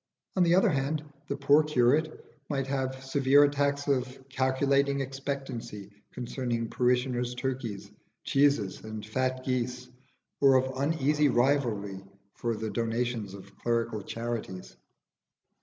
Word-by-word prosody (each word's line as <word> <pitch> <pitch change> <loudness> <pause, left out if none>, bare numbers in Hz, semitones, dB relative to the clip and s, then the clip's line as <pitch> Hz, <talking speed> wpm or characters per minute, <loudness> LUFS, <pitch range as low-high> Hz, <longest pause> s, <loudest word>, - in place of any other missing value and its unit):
On 185 - +2
the 175 0 +5
other 190 +1 +4
hand, 145 +2 -1 0.2
the 140 - -3
poor 140 +2 +5
curate 150 +1 +1 0.2
might 135 -2 -1
have 130 -1 -3
severe 135 +1 +4
attacks 140 0 +1
of 130 -1 -1
calculating 140 +1 +1
expectancy 135 -6 -5 0.2
concerning 120 -2 -3
parishioners' 125 0 +1
turkeys, 125 -6 -4 0.3
cheeses, 140 -9 +2
and 110 -1 -6
fat 130 +3 -1
geese, 125 -1 -2 0.5
or 135 -1 +6
of 130 0 +2
uneasy 150 +1 +2
rivalry 120 -7 +1 0.3
for 115 -1 -2
the 110 0 -4
donations 115 -3 -2
of 95 - -13
clerical 115 -2 -1
charities. 115 -4 -5
130 Hz, 120 wpm, -29 LUFS, 120-140 Hz, 0.5 s, or